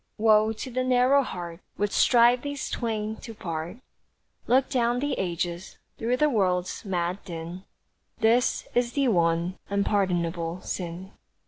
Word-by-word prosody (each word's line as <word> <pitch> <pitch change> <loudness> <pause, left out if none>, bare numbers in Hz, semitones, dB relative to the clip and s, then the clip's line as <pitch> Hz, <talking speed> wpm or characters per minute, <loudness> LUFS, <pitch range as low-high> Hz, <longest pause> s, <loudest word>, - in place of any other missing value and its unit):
Woe 215 0 +4
to 250 +4 -7
the 255 +1 0
narrow 255 +2 +4
heart 175 -8 -6 0.2
Would 205 0 0
strive 240 0 +5
these 285 0 -4
twain 220 -2 -2
to 225 - -10
part; 165 +1 -5 0.7
Look 260 +2 +4
down 245 -2 +1
the 285 +1 -1
ages, 175 0 -3 0.2
through 240 +3 0
the 300 - +4
world's 185 -8 0
mad 180 -1 -2
din, 170 +2 -7 0.5
This 235 +2 +2
is 240 0 +1
the 275 -3 +2
one 170 -1 +1
unpardonable 180 -4 0
sin. 180 +2 -5
205 Hz, 135 wpm, -26 LUFS, 175-245 Hz, 0.7 s, strive